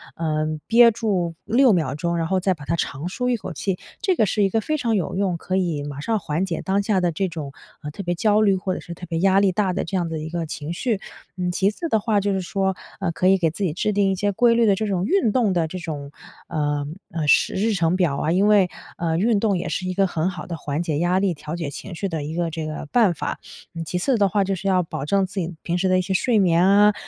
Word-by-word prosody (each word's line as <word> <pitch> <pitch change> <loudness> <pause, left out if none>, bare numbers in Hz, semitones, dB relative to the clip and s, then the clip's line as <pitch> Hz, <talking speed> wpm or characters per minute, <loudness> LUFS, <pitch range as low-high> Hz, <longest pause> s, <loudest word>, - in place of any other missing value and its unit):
呃， 155 -1 -1 0.2
憋 235 +1 +7
住 195 -7 -1
6 240 +2 +4
秒 155 -7 0
钟， 170 +3 -1
然 165 - 0
后 190 +2 +1
再 185 +1 +1
把 150 -4 -11
它 165 - 0
长 150 -1 -3
舒 250 +6 -2
一 245 - +1
口 185 -3 -7
气， 185 +4 -2 0.2
这 385 -4 +2
个 220 - +3
是 210 +1 +1
一 195 - +3
个 225 +3 0
非 310 +8 -1
常 235 -6 0
有 180 -4 -1
用， 185 -3 0
可 185 - -3
以 170 -6 0
马 145 -1 -6
上 220 +9 0
缓 165 +1 -1
解 175 -3 -3
当 195 +1 +1
下 200 -2 +1
的 175 -1 +1
这 190 +4 -1
种， 155 -5 -6 0.3
呃， 150 - -5
特 175 - -7
别 175 -1 -1
焦 210 +4 +3
虑 200 -3 +4
或 185 0 -2
者 - - -4
是 170 - -8
特 175 - -9
别 165 -1 -3
压 190 +2 +4
力 195 -2 +3
大 185 0 0
的 - - -1
这 190 +3 -2
样 175 -2 -1
的 160 -1 -3
一 155 +1 -5
个 170 0 -3
情 155 0 -6
绪。 220 +2 -1 0.4
嗯， 180 0 -1
其 190 +2 +2
次 330 +10 -5
的 220 - +3
话 210 0 +1
就 200 +1 0
是 190 - -1
说， 190 +1 -1 0.2
呃， 190 -4 -1
可 180 +2 0
以 195 +1 +5
给 165 -3 +2
自 170 +6 -5
己 170 -6 0
制 200 +5 0
定 200 -1 +2
一 - - 0
些 205 +2 0
规 235 +4 +4
律 235 0 +4
的 205 - +5
这 215 +2 -2
种 185 -3 0
运 360 - +2
动 225 -3 +2
的 170 -2 +1
这 185 +3 -6
种， 145 -5 -6 0.4
呃， 145 -2 -1 0.3
呃， 160 -3 -2
时 - - +4
日 215 +3 +1
程 170 -2 +1
表 165 -7 +1
啊， 155 - 0
因 190 +4 +3
为， 205 -4 +5 0.3
呃， 165 -1 0
运 215 +3 +2
动 200 -3 +1
也 - - -4
是 185 - -2
一 185 - -2
个 195 +1 +2
很 170 0 -1
好 190 - -7
的 170 - -5
缓 145 +1 -3
解 155 -4 -1
压 175 +2 +2
力、 195 -2 +1
调 150 +1 -6
节 165 -4 -3
情 180 +6 -8
绪 195 - -2
的 160 -4 -3
一 150 +2 -5
个 170 -1 0
这 160 -1 -4
个 155 0 -5
办 220 -7 +4
法。 - - -4 0.5
其 180 - -2
次 240 +8 +1
的 200 -2 +4
话， 200 +2 +2
就 195 0 -1
是 195 - -5
要 185 -1 +3
保 160 - -5
证 195 +5 +2
自 190 +1 -5
己 175 0 -3
平 175 +1 -1
时 190 +1 +1
的 185 - +4
一 - - +2
些 190 +1 -2
睡 220 +4 +2
眠 175 -2 +4
啊， 205 +2 +6
185 Hz, 305 characters per minute, -22 LUFS, 165-200 Hz, 0.5 s, 憋